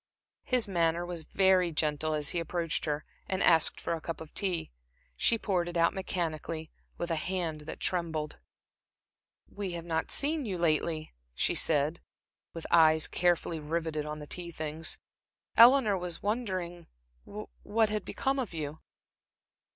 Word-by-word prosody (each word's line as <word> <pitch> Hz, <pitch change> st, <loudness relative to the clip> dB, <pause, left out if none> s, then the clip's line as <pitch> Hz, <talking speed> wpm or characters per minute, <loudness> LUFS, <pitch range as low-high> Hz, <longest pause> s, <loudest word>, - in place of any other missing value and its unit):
His 250 Hz, -4 st, +2 dB
manner 170 Hz, -2 st, +1 dB
was 175 Hz, -3 st, -4 dB
very 190 Hz, -2 st, +3 dB
gentle 155 Hz, 0 st, 0 dB
as 150 Hz, -2 st, +1 dB
he 175 Hz, -, 0 dB
approached 165 Hz, -1 st, -1 dB
her 150 Hz, -1 st, -2 dB, 0.2 s
and 190 Hz, 0 st, 0 dB
asked 165 Hz, -2 st, +5 dB
for -, -, -2 dB
a 165 Hz, -, -4 dB
cup 165 Hz, -, -5 dB
of 160 Hz, -1 st, -10 dB
tea. 185 Hz, -, -1 dB, 0.4 s
She 230 Hz, -, +3 dB
poured 180 Hz, -5 st, 0 dB
it 175 Hz, -, -3 dB
out 170 Hz, -, +4 dB
mechanically, 165 Hz, -4 st, -3 dB, 0.3 s
with 175 Hz, 0 st, -3 dB
a -, -, +2 dB
hand 165 Hz, -2 st, -2 dB
that -, -, -6 dB
trembled. 160 Hz, -4 st, -2 dB, 1.1 s
"We 200 Hz, -3 st, -5 dB
have 170 Hz, -1 st, -5 dB
not 160 Hz, -1 st, -1 dB
seen 300 Hz, +1 st, +2 dB
you 200 Hz, -6 st, -3 dB
lately," 160 Hz, -, 0 dB, 0.2 s
she -, -, +1 dB
said, 150 Hz, +2 st, +1 dB, 0.5 s
with 165 Hz, -, -7 dB
eyes 160 Hz, -2 st, +6 dB
carefully 175 Hz, -2 st, +1 dB
riveted 155 Hz, 0 st, -2 dB
on 150 Hz, 0 st, -4 dB
the 150 Hz, -, -8 dB
tea 175 Hz, +3 st, -4 dB
things. 155 Hz, 0 st, -2 dB, 0.6 s
"Eleanor 235 Hz, -3 st, +7 dB
was 175 Hz, -2 st, -3 dB
wondering 185 Hz, -6 st, -2 dB, 0.4 s
what 210 Hz, -, -1 dB
had 210 Hz, -1 st, -1 dB
become 270 Hz, 0 st, -1 dB
of 225 Hz, -10 st, -3 dB
you." 155 Hz, 0 st, -4 dB
170 Hz, 150 wpm, -30 LUFS, 155-185 Hz, 1.1 s, Eleanor